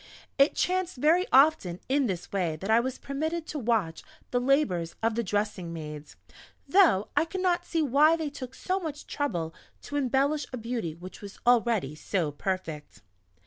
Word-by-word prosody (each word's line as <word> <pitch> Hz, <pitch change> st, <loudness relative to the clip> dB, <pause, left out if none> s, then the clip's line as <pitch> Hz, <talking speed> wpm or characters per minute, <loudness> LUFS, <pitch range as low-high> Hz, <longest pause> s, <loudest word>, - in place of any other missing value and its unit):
It 275 Hz, +2 st, +5 dB
chanced 370 Hz, 0 st, 0 dB
very 330 Hz, +8 st, +3 dB
often 260 Hz, -, +4 dB
in 275 Hz, 0 st, +2 dB
this 180 Hz, -3 st, -4 dB
way 180 Hz, -5 st, 0 dB
that 195 Hz, +7 st, -3 dB
I 225 Hz, -, +6 dB
was 255 Hz, +2 st, -2 dB
permitted 315 Hz, +4 st, -3 dB
to 305 Hz, -, -5 dB
watch 215 Hz, -9 st, 0 dB, 0.3 s
the 245 Hz, -, +1 dB
labours 230 Hz, -, +1 dB
of 225 Hz, 0 st, +2 dB
the 235 Hz, -, 0 dB
dressing 205 Hz, -4 st, -2 dB
maids 150 Hz, -2 st, -8 dB, 0.5 s
(though 295 Hz, -, +4 dB
I 295 Hz, -, +4 dB
could 365 Hz, +3 st, -4 dB
not 350 Hz, -1 st, +1 dB
see 330 Hz, -2 st, 0 dB
why 300 Hz, +4 st, +5 dB
they 315 Hz, -3 st, -3 dB
took 260 Hz, -2 st, -8 dB
so 375 Hz, +1 st, -1 dB
much 305 Hz, -4 st, -6 dB
trouble 170 Hz, -, -2 dB, 0.3 s
to 290 Hz, -, -4 dB
embellish 280 Hz, +2 st, +1 dB
a 255 Hz, -, -4 dB
beauty 230 Hz, -8 st, -3 dB
which 180 Hz, +2 st, -11 dB
was 200 Hz, -1 st, -9 dB
already 230 Hz, -, +3 dB
so 160 Hz, 0 st, -2 dB
perfect). 160 Hz, -2 st, -5 dB
245 Hz, 175 wpm, -28 LUFS, 185-300 Hz, 0.5 s, I